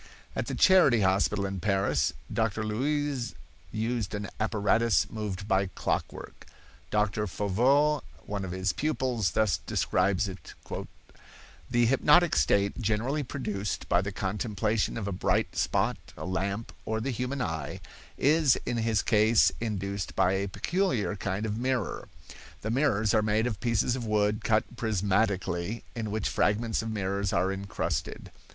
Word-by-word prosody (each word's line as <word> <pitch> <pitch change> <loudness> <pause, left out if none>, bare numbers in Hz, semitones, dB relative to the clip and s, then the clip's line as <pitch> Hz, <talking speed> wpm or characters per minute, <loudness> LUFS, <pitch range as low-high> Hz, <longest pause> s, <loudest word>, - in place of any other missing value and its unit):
At - - -2
the - - -3
Charity 175 - +5
hospital 100 +1 +2
in 95 -1 -3
Paris, 95 -8 +1 0.2
Doctor 110 -1 0
Luys 135 +3 -1 0.4
used 110 -2 -2
an 105 -1 -4
apparatus 110 -5 +2
moved 105 -3 -4
by 95 -1 +2
clockwork. - - -4 0.4
Doctor 105 0 0
Foveau, 130 +11 +2 0.2
one 100 -1 -3
of 95 - -4
his 95 +1 -1
pupils, 130 - 0
thus 95 -9 +2
describes 100 +2 +1
it: 95 0 -9 1.1
"The 120 -1 +3
hypnotic 150 +7 +4
state, 100 - +2
generally 115 +7 0
produced 105 -7 -4
by 90 - +3
the 100 +1 -4
contemplation 105 +3 -1
of 105 -3 -3
a - - -2
bright 90 - 0
spot, - - +1 0.2
a - - -6
lamp, 100 +4 -2
or 110 0 -2
the 135 +5 -2
human 125 +3 -3
eye, 80 - -3 0.4
is 150 -2 +4
in 120 - -1
his 115 -1 +1
case 110 +1 +4
induced 100 -4 -3
by 90 - +3
a 95 +1 0
peculiar 115 - 0
kind 100 +1 -3
of 110 +1 -2
mirror. 130 0 -1 0.5
The 110 - -2
mirrors 115 -5 +2
are 110 - +4
made 110 +1 +1
of 110 -5 -2
pieces 120 +1 +1
of 120 -3 -4
wood 105 0 +1
cut 110 -1 +3
prismatically 100 -2 0
in 110 -2 -3
which 110 0 -1
fragments 110 +2 +1
of 115 - -4
mirrors 100 -2 -1
are 95 - +1
incrusted. 95 -1 -3
105 Hz, 145 wpm, -28 LUFS, 100-120 Hz, 1.1 s, Charity